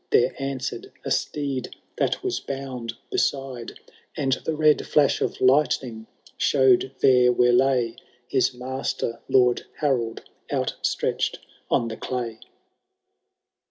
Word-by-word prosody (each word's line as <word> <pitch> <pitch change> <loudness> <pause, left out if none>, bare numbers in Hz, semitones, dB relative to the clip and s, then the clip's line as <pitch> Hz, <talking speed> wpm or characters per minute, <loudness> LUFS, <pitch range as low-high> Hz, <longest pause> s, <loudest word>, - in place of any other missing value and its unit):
There 125 +2 +3
answered 135 -1 -4
a - - -3
steed 140 -3 -2 0.2
that - - 0
was 380 -1 -1
bound 130 -4 -5 0.2
beside, 135 -4 -2 0.4
And 135 -2 +1
the 160 - -1
red 155 -1 +4
flash 145 -2 +3
of - - -1
lightning 130 -4 +2 0.3
show'd 130 -1 +3
there 125 -1 +6
where 125 0 +3
lay 125 -2 +2 0.3
His 130 0 +2
master. 125 -2 -3
Lord 125 -2 +4
Harold, 120 -6 -1 0.3
outstretch^ - - -1 0.3
on 115 - +2
the 110 - -6
clay. 120 -3 -4
130 Hz, 115 wpm, -24 LUFS, 120-135 Hz, 0.4 s, there